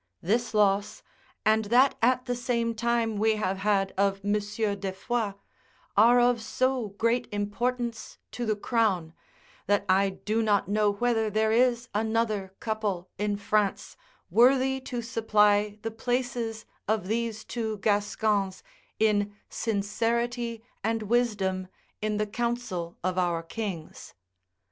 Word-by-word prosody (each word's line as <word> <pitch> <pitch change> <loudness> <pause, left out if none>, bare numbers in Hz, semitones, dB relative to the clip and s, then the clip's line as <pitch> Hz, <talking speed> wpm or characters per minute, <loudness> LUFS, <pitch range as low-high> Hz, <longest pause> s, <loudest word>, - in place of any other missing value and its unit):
This 225 +4 0
loss, 200 -1 +2 0.4
and 220 0 +3
that 250 +6 +5
at 250 +2 +3
the 245 -1 -1
same 235 -1 -1
time 230 -1 0
we 220 +1 +3
have 195 -3 -1
had 195 -1 +1
of 195 0 +1
Monsieur 210 +1 0
de 195 -1 -4
Foix, 215 +1 -2 0.6
are 235 +4 +6
of 245 -1 +3
so 255 0 0
great 230 +2 +1
importance 230 +3 -2
to 245 - -4
the 215 - +2
crown, 205 -7 0 0.5
that 205 0 +2
I 195 +1 +4
do 215 +4 -2
not 205 -3 +2
know 210 +1 +2
whether 225 0 +1
there 220 +1 +1
is 240 +1 +2
another 215 -2 0
couple 205 -5 -3
in 205 0 0
France 205 0 0 0.4
worthy 265 +2 +4
to 245 -2 -4
supply 210 -2 +2
the 225 - -2
places 240 -1 -2 0.2
of 215 -3 0
these 225 0 -2
two 220 -2 -3
Gascons 205 -1 0 0.3
in 205 -2 +2
sincerity 230 +2 -1 0.2
and 225 0 0
wisdom 205 -5 0 0.3
in 215 0 -1
the 210 - +1
council 210 -6 -3
of 185 0 0
our 170 -2 0
kings. 180 -3 -6
220 Hz, 130 wpm, -27 LUFS, 205-235 Hz, 0.6 s, are